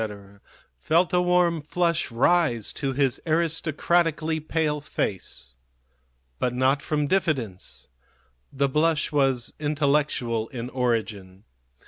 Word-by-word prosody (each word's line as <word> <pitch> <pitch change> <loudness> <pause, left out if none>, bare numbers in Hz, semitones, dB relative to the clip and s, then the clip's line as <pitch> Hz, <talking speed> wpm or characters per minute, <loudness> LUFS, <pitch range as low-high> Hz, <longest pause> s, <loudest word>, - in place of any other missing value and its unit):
felt 170 - +2
a 180 - +4
warm 180 -2 +2
flush 170 +2 0
rise 125 -1 +1
to 140 -2 -2
his 135 -1 0
aristocratically 165 0 +1
pale 155 -1 -1
face. 65 - -4 0.9
But 125 -1 -1
not 130 +3 +2
from 150 0 -1
diffidence. 135 - -1 0.6
The 140 +1 +1
blush 155 +3 +1
was 135 -4 +1
intellectual 145 -6 0
in 125 0 -6
origin. 110 -6 -2
145 Hz, 100 wpm, -25 LUFS, 125-160 Hz, 0.9 s, a